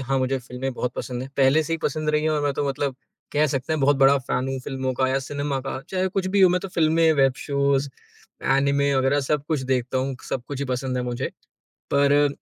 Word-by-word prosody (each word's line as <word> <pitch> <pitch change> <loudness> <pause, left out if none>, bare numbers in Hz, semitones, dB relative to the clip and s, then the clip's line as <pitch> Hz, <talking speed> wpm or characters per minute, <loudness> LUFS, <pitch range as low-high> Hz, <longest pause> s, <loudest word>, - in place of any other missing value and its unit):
हाँ, 135 +1 0
मुझे 130 +1 0
फ़िल्में 125 +1 -5
बहुत 125 0 -3
पसंद 125 -1 -4
हैं 135 - -8
पहले 140 +3 +4
से 165 - -4
ही - - +2
पसंद 155 +1 -1
रही 150 0 +1
हैं 155 - +1
और 150 -1 0
मैं 145 -1 +1
तो 145 - -1
मतलब 135 0 -2 0.4
कह 150 +1 +3
सकते 135 +2 -2
हैं 155 - 0
बहुत 140 +1 +4
बड़ा 135 +1 +5
फ़ैन 130 0 -2
हूँ 135 - -2
फ़िल्मों 130 -1 -2
का 130 +1 +1
या 135 +1 +1
सिनेमा 140 0 -3
का, 135 0 -5
चाहे 190 0 0
कुछ 190 0 -2
भी 195 +1 +1
हो 190 - +8
मैं 180 +1 +1
तो 195 - -6
फ़िल्में, 165 -2 +3
वेब 135 -3 +3
शोज़, 140 -1 0 0.7
एनिमे 140 0 +2
वगैरह 135 +2 +2
सब 145 +1 -1
कुछ 155 -4 0
देखता 130 0 0
हूँ, 130 0 -2
सब 130 - -2
कुछ 140 -2 -5
ही 140 - -2
पसंद 130 0 -2
है 125 - -1
मुझे। 120 -1 -3 0.6
पर 140 0 +4
अ, 145 0 +4
140 Hz, 245 wpm, -24 LUFS, 130-150 Hz, 0.7 s, हो